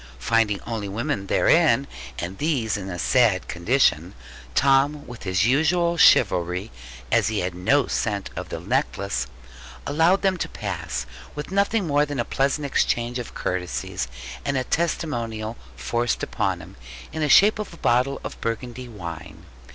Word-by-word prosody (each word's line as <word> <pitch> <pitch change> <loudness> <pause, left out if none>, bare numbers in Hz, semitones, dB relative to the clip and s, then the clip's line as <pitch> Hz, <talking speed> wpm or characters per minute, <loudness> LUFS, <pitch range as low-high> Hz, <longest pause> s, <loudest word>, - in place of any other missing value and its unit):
Finding 105 - +1
only 110 -4 -4
women 100 -1 -2
therein, 155 - +4 0.3
and 90 +2 -5
these 135 -9 0
in 95 -2 -5
a 90 - -5
sad 110 0 +3
condition, 85 - +1 0.4
Tom 140 - +3
with 120 -2 -10
his 95 0 +1
usual 165 +7 +2
chivalry 90 - +4 0.4
(as - - +3
he 110 -2 0
had 90 0 -2
no 125 +10 +2
scent 100 -3 -2
of - - -6
the - - -4
necklace) 65 +1 -1 0.6
allowed 165 +7 +3
them 190 -1 +2
to - - -3
pass; - - -4 0.3
with 150 +4 -6
nothing 200 +1 +1
more 145 -2 +3
than 145 -3 -3
a 120 - 0
pleasant 140 +2 0
exchange 120 -2 0
of 120 - -7
courtesies, 90 -7 -3 0.4
and 140 -1 -1
a 130 - 0
testimonial 120 -9 -2 0.2
forced 120 0 -1
upon - - -1
him, - - -14 0.4
in 160 - -3
the 150 - +1
shape 210 +8 +6
of 210 - -4
a 170 - -12
bottle 125 +2 +1
of - - -7
Burgundy 120 +2 -4
wine. 85 -7 -8
120 Hz, 155 wpm, -24 LUFS, 100-145 Hz, 0.6 s, shape